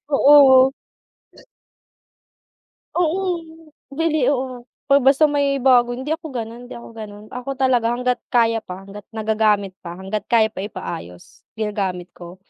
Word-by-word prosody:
oo. 270 -2 +7 2.3
Oo, 350 +1 +1 0.8
bili. 310 -4 +1
Oo, 255 -2 -2 0.2
ba 280 - +7
basta 275 +3 +4
may 285 -2 +2
bago 245 -2 +4
hindi 265 +4 -5
ako 320 0 -3
gano'n, 235 +1 -6
hindi - - -9
ako 235 - -11
gano'n. 210 -2 -10
Ako 250 +2 -5
talaga 255 -3 +2
hangga't 250 0 -1
kaya 230 -2 +2
pa, 185 -2 -10
hangga't 200 +1 -12
nagagamit 215 -2 +1
pa, 170 -1 -8
hangga't 195 +2 -5
kaya 220 -2 +3
pa 190 - -9
ipaayos 90 - -8
ginagamit 195 -5 -3
ko, 175 +1 -12
235 Hz, 135 wpm, -21 LUFS, 205-265 Hz, 2.3 s, oo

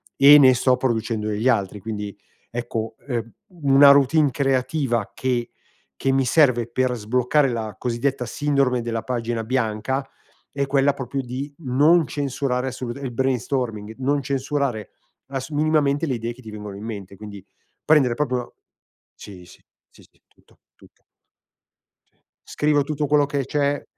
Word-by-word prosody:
e 140 +2 +8
ne 130 -3 +7
sto 125 +1 +2
producendo 115 -3 -1
degli 110 +4 0
altri. 100 -2 0
Quindi 105 -1 -6 0.3
ecco, 115 -2 -4
ehm, 115 -4 -3 0.3
una 140 +1 +7
routine 140 +1 +4
creativa 130 -3 0
che 125 -2 -2 0.5
che 135 - 0
mi 135 0 +2
serve 125 -4 +3
per 125 +1 0
sbloccare 125 +5 +1
la 110 -4 -4
cosiddetta 125 +2 -2
sindrome 135 -1 0
della 115 -1 -3
pagina 120 -2 -3
bianca 125 +2 -2 0.5
è 140 0 -1
quella 140 +1 +2
proprio 135 +1 -4
di 130 +4 -6
non 150 +3 +3
censurare 135 -2 -2
assoluta 130 0 -5
il 130 -3 -4
brainstorming, 120 -4 -2
non 140 +2 0
censurare 135 -5 -2 0.4
ass 135 +1 -5
minimamente 150 0 +1
le 130 - -1
idee 115 +1 -4
che 130 - -16
ti 110 - -10
vengono 105 -2 -8
in 100 - -9
mente, 100 -4 -7
quindi 100 -1 -10 0.4
prendere 140 -6 +4
proprio 125 -3 -2 0.6
sì, 90 -3 -12
sì, 85 - -18 0.3
sì, - - -20
sì, - - -36
tutto, - - -29 0.2
tutto. - - -22 1.4
Scrivo 150 -1 +1
tutto 150 0 -2
quello 145 0 +3
che 140 -2 -2
c'è 145 +1 -1
130 Hz, 145 wpm, -22 LUFS, 115-140 Hz, 1.4 s, e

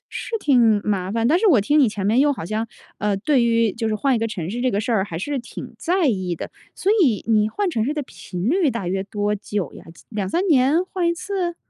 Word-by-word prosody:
是 455 - -3
挺 240 - +4
麻 190 -3 -1
烦， 230 0 +1
但 315 +7 +4
是 440 - +2
我 255 - +5
听 290 +9 +2
你 270 -5 +5
前 205 -2 -3
面 220 +4 +3
又 290 +1 +4
好 245 - -6
像， 215 +4 -2 0.3
呃， 210 -1 0
对 255 +6 +2
于 230 -3 +2
就 225 -1 -2
是 215 - 0
换 265 +5 +1
一 - - +1
个 225 - 0
城 180 -7 -5
市 240 +4 -4
这 255 - +1
个 205 - 0
事 225 +3 -2
儿 200 -4 +2
还 165 -5 -6
是 285 +9 -2
挺 240 - -9
在 355 0 +1
意 185 -8 0
的， - - -6 0.2
所 390 - 0
以 240 - +2
你 215 -1 +3
换 400 - -1
城 225 -11 -1
市 280 - -1
的 300 -1 -3
频 185 -5 -5
率 335 -2 +2
大 235 -7 -4
约 190 +1 -1
多 205 +1 -2
久 200 -6 -4
呀？ - - -12 0.2
2，3 215 - -1
年 300 +2 +3
换 370 -2 -1
一 340 - +1
次？ 360 -1 -3
230 Hz, 265 characters per minute, -22 LUFS, 205-295 Hz, 0.3 s, 我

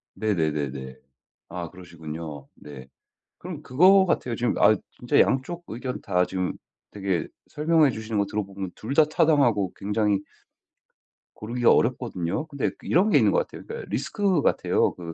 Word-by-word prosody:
네네네네. 75 -10 -2 0.5
아 85 -1 -5
그러시군요. 80 -5 -9
네. 70 -3 -11 0.5
그럼 170 -4 -8
그거 185 +9 +5
같아요. 125 -8 -1
지금 120 - 0
아 110 - +6 0.2
진짜 120 - +1
양쪽 170 +7 0
의견 125 +2 -5
다 90 -2 +1
지금 90 0 -2 0.4
되게 95 -5 -2 0.2
설명해 155 -1 +3
주시는 110 -2 -4
거 100 - +1
들어보면 100 -2 -4
2 120 +6 -5
다 155 - +6
타당하고 140 - +2
굉장히 105 0 0 1.1
고르기가 120 +2 +1
어렵거든요. 120 - 0
근데 140 -3 -2
그 - - -13
이런 190 +6 +3
게 - - +5
있는 - - +4
것 - - +2
같아요. - - -11
그러니까 465 +1 -7
리스크 200 -7 0
같아요. - - +1
그 85 -2 -8
110 Hz, 330 characters per minute, -25 LUFS, 90-145 Hz, 1.1 s, 아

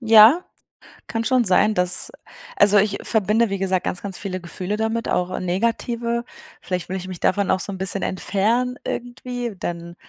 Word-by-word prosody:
Ja, 225 +8 +7 0.6
kann 225 0 -2
schon 255 0 +2
sein, 210 +3 +4
dass 180 -2 +2 0.5
also, 205 0 +6
ich 200 0 +2
verbinde, 220 +1 +2
wie 195 - -2
gesagt, 190 -1 0
ganz, 175 - -2
ganz 195 -3 -5
viele 185 -2 -5
Gefühle 180 +4 -4
damit, 225 +1 -1
auch 180 +1 -1
negative. 235 +5 -1 0.4
Vielleicht 180 -2 -4
will 190 - -2
ich 185 - -7
mich 185 -2 -7
davon 200 +1 +1
auch 190 - +2
so - - -1
'n 190 - -6
bisschen 190 +1 -2
entfernen, 225 +7 0
irgendwie. 245 -2 -4
Dann 170 -1 -5
205 Hz, 175 wpm, -22 LUFS, 185-230 Hz, 0.6 s, Ja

